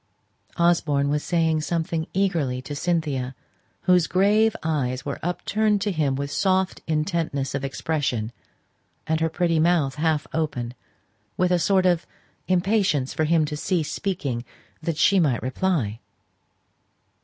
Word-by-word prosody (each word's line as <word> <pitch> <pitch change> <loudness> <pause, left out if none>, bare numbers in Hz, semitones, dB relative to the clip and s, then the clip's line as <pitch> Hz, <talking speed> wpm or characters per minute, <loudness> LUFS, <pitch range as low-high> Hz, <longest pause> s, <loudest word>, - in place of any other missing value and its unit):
Osborne 160 -5 +2
was 150 0 0
saying 160 -3 +1
something 160 0 -2
eagerly 165 -10 0
to 145 - -6
Cynthia, 145 -6 -1 0.5
whose 180 -3 +4
grave 210 +4 +3
eyes 135 -5 -1
were 140 - -4
upturned 210 +4 0
to 205 - 0
him 150 -6 0
with 140 +1 -3
soft 190 +1 +1
intentness 155 -3 -1
of 140 0 -2
expression, 135 -5 -2 0.7
and 160 0 0
her 165 0 +1
pretty 165 0 +1
mouth 160 -4 +2
half 160 -2 +1
open, 130 -7 -2 0.6
with 180 0 +2
a 180 - +3
sort 190 +1 +3
of 175 -2 +2 0.4
impatience 185 -7 +1
for 155 - 0
him 160 0 +3
to 150 - -4
cease 160 0 -1
speaking, 140 -11 -2 0.4
that 165 -1 -2
she 195 +5 +4
might 140 -9 +1
reply. 130 - -1
160 Hz, 135 wpm, -24 LUFS, 140-180 Hz, 0.7 s, whose